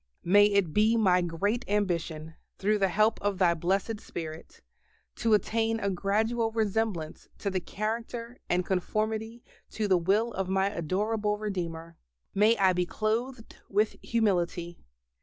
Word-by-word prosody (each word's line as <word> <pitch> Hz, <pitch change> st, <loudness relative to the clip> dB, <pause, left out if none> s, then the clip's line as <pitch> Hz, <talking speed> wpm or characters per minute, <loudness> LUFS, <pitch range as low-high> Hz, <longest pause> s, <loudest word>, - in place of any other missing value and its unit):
May 205 Hz, +4 st, +6 dB
it 200 Hz, -6 st, +1 dB
be 220 Hz, +2 st, +4 dB
my 185 Hz, -5 st, +4 dB
great 200 Hz, +8 st, -1 dB
ambition, 170 Hz, -6 st, -1 dB, 0.2 s
through 210 Hz, +2 st, +1 dB
the 195 Hz, -, +3 dB
help 215 Hz, +4 st, +2 dB
of 205 Hz, -1 st, 0 dB
Thy 180 Hz, -2 st, +4 dB
Blessed 195 Hz, +6 st, -1 dB
Spirit, 160 Hz, -1 st, -8 dB, 0.6 s
to 225 Hz, -2 st, +3 dB
attain 225 Hz, +1 st, 0 dB
a 200 Hz, -2 st, -1 dB
gradual 220 Hz, +5 st, 0 dB
resemblance 215 Hz, -7 st, -2 dB
to 200 Hz, -, -3 dB
the 190 Hz, -, 0 dB
character 230 Hz, +5 st, -4 dB
and 180 Hz, 0 st, +1 dB
conformity 220 Hz, +5 st, -2 dB, 0.3 s
to 215 Hz, -2 st, -2 dB
the 185 Hz, -2 st, +4 dB
will 205 Hz, +7 st, +1 dB
of 190 Hz, -1 st, -2 dB
my 190 Hz, +1 st, +1 dB
adorable 210 Hz, +5 st, -1 dB
Redeemer. 170 Hz, -5 st, -5 dB, 0.4 s
May 215 Hz, +3 st, +4 dB
I 190 Hz, -1 st, +4 dB
be 180 Hz, 0 st, 0 dB
clothed 225 Hz, +4 st, -3 dB
with 210 Hz, +2 st, +1 dB
humility. 175 Hz, -6 st, 0 dB
205 Hz, 140 wpm, -28 LUFS, 180-220 Hz, 0.6 s, May